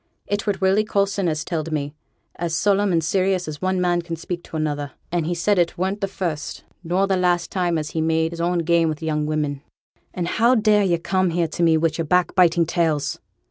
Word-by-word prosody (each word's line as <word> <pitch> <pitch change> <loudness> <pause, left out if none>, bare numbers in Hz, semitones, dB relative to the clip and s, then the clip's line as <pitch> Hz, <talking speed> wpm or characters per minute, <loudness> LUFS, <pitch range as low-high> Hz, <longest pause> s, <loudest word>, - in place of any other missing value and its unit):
'It 205 0 -2
were 205 - +2
Willie 190 +3 +3
Coulson 200 -3 0
as 155 0 -2
telled 165 -2 -3
me, 145 -1 -2 0.4
as 170 -1 -2
solemn 200 +2 +2
and 165 -2 +2
serious 185 +1 +1
as 150 -1 -6
one 185 0 0
man 175 -1 +1
can 170 -1 -5
speak 170 +2 -5
to 160 - -7
another; 145 -2 -2 0.2
and 170 -2 0
he 175 - -1
said 195 +3 +2
it 170 -1 +1
weren't 190 +3 -2
the 195 - 0
first 170 -6 -4 0.2
nor 180 +3 +1
the 195 -1 +1
last 180 -1 +1
time 175 -3 0
as 150 -1 -4
he 160 - -2
had 160 - 0
made 160 0 +1
his 170 0 -5
own 175 +1 +1
game 165 0 +3
with 155 +1 -5
young 150 -1 -1
women.' 150 -2 -2 0.5
'And 175 -2 -3
how 235 +7 +3
dare 210 -2 +4
yo' 175 -3 +2
come 185 +2 0
here 170 0 0
to - - -5
me 165 -1 +4
wi' 165 0 +2
yo'r 165 - -1
backbiting 175 0 +3
tales?' 160 -3 0
170 Hz, 225 wpm, -22 LUFS, 160-190 Hz, 0.5 s, dare